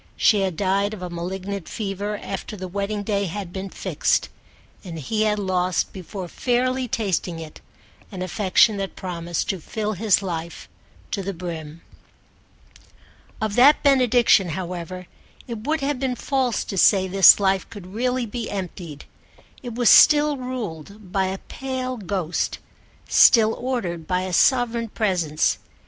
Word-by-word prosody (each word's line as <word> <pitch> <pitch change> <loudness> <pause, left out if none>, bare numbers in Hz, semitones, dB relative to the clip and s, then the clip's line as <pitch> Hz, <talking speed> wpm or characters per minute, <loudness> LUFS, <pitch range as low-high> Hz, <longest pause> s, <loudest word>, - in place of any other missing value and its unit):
She 210 -3 +4
had 185 -4 -2
died 200 +3 0
of 185 - -10
a 180 - -5
malignant 185 +2 -5
fever 205 0 -4
after 200 +2 -6
the 185 0 -6
wedding 200 +2 -3
day 200 -1 0
had 185 0 -6
been 195 0 -5
fixed, - - 0 0.5
and 170 -4 -7
he 215 +9 -2
had 210 -1 +1
lost 185 -3 -1
before 185 0 -7
fairly 255 +5 0
tasting 190 -6 -2
it 160 -2 -10 0.5
an 185 -2 -5
affection 200 +3 +3
that 195 -1 -4
promised 175 -2 -4
to 190 - -1
fill 215 +5 -3
his 200 0 +2
life 170 -2 -5 0.4
to 200 - -2
the 195 0 -4
brim. 165 -2 -7 1.6
Of 215 -2 -2
that 280 +5 +6
benediction, 245 - +4
however, 180 0 -6 0.4
it 230 0 -7
would 315 0 0
have 275 -1 -1
been 260 -2 -1
false 260 -2 -1
to 195 - -3
say 190 0 +5
this 190 0 +7
life 195 -1 +1
could 205 -4 -10
really 250 +2 0
be 230 +1 -5
emptied: 175 -6 -6 0.6
it 240 -3 -7
was 240 -1 +4
still 295 -1 +6
ruled 210 - -7
by 190 0 +1
a 190 +1 -3
pale 255 +2 -5
ghost, 185 -4 -2 0.5
still 225 -2 +6
ordered 185 -11 -3
by 180 0 0
a 185 -1 -4
sovereign 235 +2 +2
presence. 180 -9 0
200 Hz, 150 wpm, -23 LUFS, 180-230 Hz, 1.6 s, this